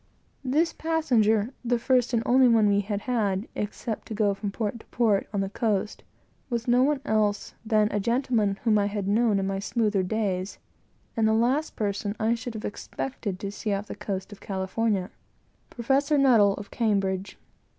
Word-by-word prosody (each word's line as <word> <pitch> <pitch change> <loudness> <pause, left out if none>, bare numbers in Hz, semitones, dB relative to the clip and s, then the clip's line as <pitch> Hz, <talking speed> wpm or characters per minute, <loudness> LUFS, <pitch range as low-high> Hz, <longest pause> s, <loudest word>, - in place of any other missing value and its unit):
This 305 +6 +1
passenger 245 -9 +1
the 245 0 +1
first 245 0 +2
and 230 -2 +1
only 255 +1 +5
one 225 -3 +4
we 200 0 +3
had 205 0 -2
had, 210 -4 -1
except 210 +1 -4
to 220 - -5
go 205 -2 +2
from 200 +1 -4
port 215 +2 -3
to - - -17
port, 220 -5 +1
on 200 -1 -1
the 195 - -2
coast, 210 -2 -1 0.5
was 235 -1 -2
no 245 +1 +4
one 280 0 +2
else 215 -3 0
than 215 -1 +3
a 205 - 0
gentleman 230 -2 +1
whom 220 -3 +3
I 200 - +1
had 205 -1 -3
known 215 0 +3
in 195 - 0
my 195 0 -2
better 210 -4 +2
days; 190 -1 -2 0.6
and 225 -2 +2
the 220 - +3
last 250 +7 +1
person 205 0 -2
I 225 +1 +2
should 235 0 -5
have 215 - -5
expected 205 -3 -5
to 200 - -3
have 200 - -6
seen 210 -1 -2
on 195 - -3
the - - -7
coast 190 0 -5
of 205 - -12
California 195 +1 -1 0.6
Professor 275 +5 +1
N, 275 -1 +4
of 205 -5 +3
Cambridge. 195 -4 -1
215 Hz, 185 wpm, -26 LUFS, 200-240 Hz, 0.6 s, only